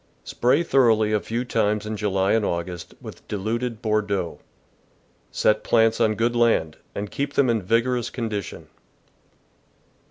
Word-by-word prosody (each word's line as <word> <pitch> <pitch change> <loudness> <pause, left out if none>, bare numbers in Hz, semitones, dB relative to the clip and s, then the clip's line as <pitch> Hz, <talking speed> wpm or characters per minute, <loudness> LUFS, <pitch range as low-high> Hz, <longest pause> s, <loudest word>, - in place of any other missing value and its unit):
— - - -39
Spray 125 +7 +2
thoroughly 115 -8 +3
a 105 - +3
few 115 +4 -3
times 105 -3 0
in 110 0 -3
July 100 -2 0
and 110 -1 +2
August 85 -2 -4
with - - -11
diluted 110 +3 -3
Bordeaux. 100 -5 -1 0.9
Set 110 0 +1
plants 115 -1 +3
on 110 -1 +3
good 120 +2 0
land, 115 -10 +2 0.2
and 100 0 -4
keep 140 0 -3
them 130 -4 +3
in 115 -2 0
vigorous 115 +4 0
condition. 110 -6 -5
110 Hz, 140 wpm, -23 LUFS, 105-120 Hz, 0.9 s, thoroughly